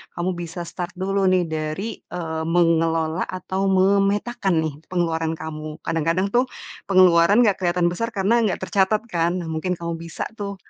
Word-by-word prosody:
kamu 175 +2 -1
bisa 170 0 -5
start 175 +1 -6
dulu 195 +1 0
nih 185 -1 +3
dari, 160 +6 -4
eee, 160 -2 -5
mengelola 165 -1 +2
atau 190 +1 -2
memetakan 195 -1 +2
nih 155 -2 -2
pengeluaran 165 -2 -1
kamu. 155 -1 -6
Kadang-kadang 165 +5 0
tuh 250 +3 +2 0.4
pengeluaran 185 +3 +5
nggak 205 -4 +2
kelihatan 175 -1 +1
besar 230 +6 -3
karena 205 +5 +3
nggak 190 - -3
tercatat 200 +3 +1
kan. 170 +1 +1
Nah, 165 - -7
mungkin 170 +3 -1
kamu 170 -1 -5
bisa 165 -1 -5 0.2
tuh 200 -1 -4
175 Hz, 155 wpm, -22 LUFS, 165-195 Hz, 0.4 s, pengeluaran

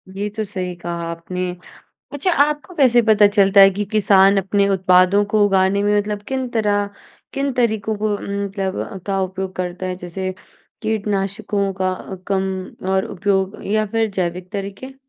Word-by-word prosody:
ये 205 +2 -2
तो 220 - -1
सही 185 -3 -5
कहा 170 0 -5
आपने, 180 +2 -4 0.6
अच्छा 290 +6 0
आपको 300 +5 -2
कैसे 255 -6 +5
पता 215 -2 +5
चलता 200 -1 +4
है 195 0 +9
कि 205 +2 -3
किसान 200 -2 +5
अपने 200 +1 +1
उत्पादों 185 +1 +4
को 215 -1 +4
उगाने 195 0 +2
में 205 0 +2
मतलब 205 0 -3
किन 260 -1 -2
तरह 205 -3 +1 0.5
किन 275 0 -1
तरीकों 220 -3 0
को 210 0 -1
उम, 200 0 -4
मतलब, 195 -1 -4
का 195 -1 0
उपयोग 190 0 -4
करता 180 0 -4
है 185 0 -3
जैसे 185 +1 -5 0.5
कीटनाशकों 200 -2 -1
का 185 0 +1 0.3
कम 195 -1 +1 0.5
और 190 0 +2
उपयोग 195 0 -1
या 215 +1 +1
फिर 225 -1 +1
जैविक 180 -1 -3
तरीक़े? 200 +6 -6
200 Hz, 160 wpm, -20 LUFS, 190-215 Hz, 0.6 s, है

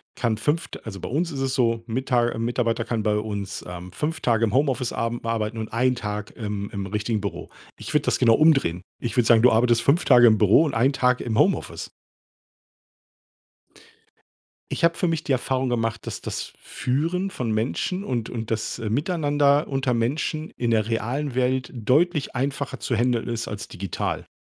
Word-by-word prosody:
kann 115 -3 0
5 150 +9 0
d - - -9
also 100 -3 -7
bei - - -6
uns 165 +6 -1
ist 140 - -5
es 135 -1 -1
so 115 -2 +1
Mita 120 0 +1
äh, - - -5
Mitarbeiter 115 0 0
kann 115 -1 -2
bei 105 -1 +2
uns, 100 -2 -4
ähm, 90 +1 -8
5 150 - -3
Tage 115 -2 +1
im 110 -2 +1
Homeoffice 130 -3 +1
abem 115 +1 -2
arbeiten 115 -1 -2
und 110 -1 -5
einen 125 +2 +2
Tag 105 -2 -5
im 105 -2 -4
im 100 -1 -4
richtigen 105 +3 -2
Büro. 90 -4 -5 0.3
Ich - - -7
würde 150 -1 +3
das - - +1
genau 115 -3 +5
umdrehen. 135 - +3 0.2
Ich 115 -3 -4
würde 120 - +4
sagen, 115 -1 +6
du 125 - +6
arbeitest 115 +1 +3
5 140 +8 +2
Tage 120 -2 +7
im 110 -1 +5
Büro 105 +8 +5
und 145 - -2
einen 130 +5 +3
Tag 125 -1 +2
im 115 -3 -1
Homeoffice. - - 0 2.8
Ich - - -3
habe 170 0 +4
für 180 - 0
mich 165 -1 -1
die - - -3
Erfahrung 130 0 0
gemacht, 115 -1 -1
dass - - -5
das - - -5
Führen 170 +9 -1
von 120 -8 -3
Menschen 125 - -1
und 120 - -2
und 115 -2 -5
das, 110 0 -2
äh, 115 -2 -5
Miteinander 145 - +2
unter 135 -3 0
Menschen 155 +6 -1
in 120 - -1
der 110 -2 +2
realen 125 +5 -2
Welt 130 0 0
deutlich 145 - +1
einfacher 135 +1 -2
zu 120 - -1
händeln 120 0 +1
ist 115 -1 -3
als 105 - -6
digital. 95 -3 -4
120 Hz, 190 wpm, -24 LUFS, 110-135 Hz, 2.8 s, Tage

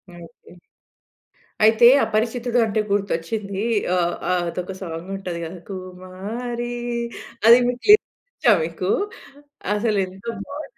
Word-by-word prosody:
Okay. 170 +1 -15 1.1
అయితే 220 +2 +6 0.2
అపరిచితుడు 235 +2 0
అంటే 215 0 -1
గుర్తొచ్చింది. 200 +1 -2 0.3
ఆహ్, 175 -1 +1 0.2
ఆహ్, 180 -1 +1
అదొక 180 +2 -5
సాంగుంటది 180 +1 -5
గదా! 170 +3 -7
కుమారి 195 +7 -6 0.7
అది 235 +2 +9
మీకు 245 0 -3
లిరిక్స్ 425 - +5 0.2
ఒచ్చా 240 - +3
మీకు? 170 +3 -3 0.9
అసలెంత 200 -3 -1 0.2
బావుంటదో 290 +7 -8
195 Hz, 100 wpm, -22 LUFS, 180-230 Hz, 1.1 s, అది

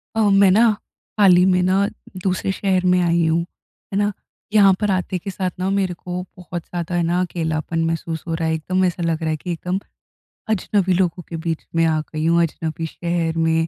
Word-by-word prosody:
अ, 225 - +2
मैं 195 -1 +6
ना 225 +5 +5 0.5
हाल 195 -3 +7
ही 180 - +5
में 180 -1 +3
ना 190 +2 +2 0.4
दूसरे 190 0 0
शहर 190 -1 0
में 180 - +4
आई 170 -1 +2
हूँ, 165 +1 +2 0.5
है - - 0
ना? 205 0 +2 0.4
यहाँ 200 -3 +7
पर 210 -2 +1
आते 185 0 -1
के 195 - -6
साथ 185 -1 -2
ना 185 +1 0
मेरे 195 -2 0
को 180 +1 -5 0.2
बहुत 175 -1 -6
ज़्यादा 175 0 -4
है 175 - +2
ना 170 +2 +1
अकेलापन 165 -2 -2
महसूस 165 0 -3
हो 165 - -2
रहा 165 0 -1
है। 160 - +1
एकदम 185 +4 0
ऐसा 175 -1 -1
लग 165 -1 0
रहा 160 - -1
है 155 - -1
कि 175 +3 -5
एकदम 180 +3 -2 0.7
अजनबी 195 -2 +1
लोगों 180 -1 0
के 165 - -4
बीच 165 -2 -2
में 165 - +3
आ 160 -1 +2
गई 155 0 -2
हूँ, 170 +1 +4
अजनबी 165 0 -3
शहर 170 0 -2
में। 165 0 +2
175 Hz, 215 wpm, -21 LUFS, 165-185 Hz, 0.7 s, हाल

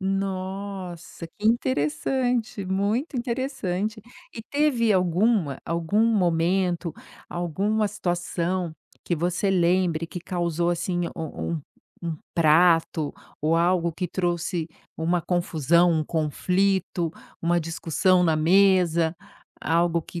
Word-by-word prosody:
Nossa, 190 -2 -4
que 210 - -1
interessante, 220 - 0
muito 205 - -1
interessante. 235 -5 -2 0.3
E 225 - -6
teve 250 -4 +2
alguma 180 - +2
algum 170 +6 +1
momento, 180 -4 +1 0.4
alguma 195 +6 0
situação 175 -3 -2 0.3
que 175 - 0
você 175 +4 0
lembre 175 -2 +2
que 180 - -7
causou 175 -1 -1
assim 175 +1 -1
um 160 0 -4
um 155 - -5 0.4
um 165 -2 -2 0.2
prato, 165 -1 +3 0.3
ou 155 +2 +2
algo 170 0 +2
que 180 +1 -3
trouxe 175 -2 -1 0.3
uma 170 +2 +1
confusão, 170 -1 +2
um 160 -1 0
conflito, 175 +2 0 0.3
uma 175 +1 +2
discussão 165 +3 +1
na 160 -2 +3
mesa? 170 -1 +3 0.5
Algo 170 0 +2
que 170 +2 -8
175 Hz, 105 wpm, -25 LUFS, 165-195 Hz, 0.5 s, prato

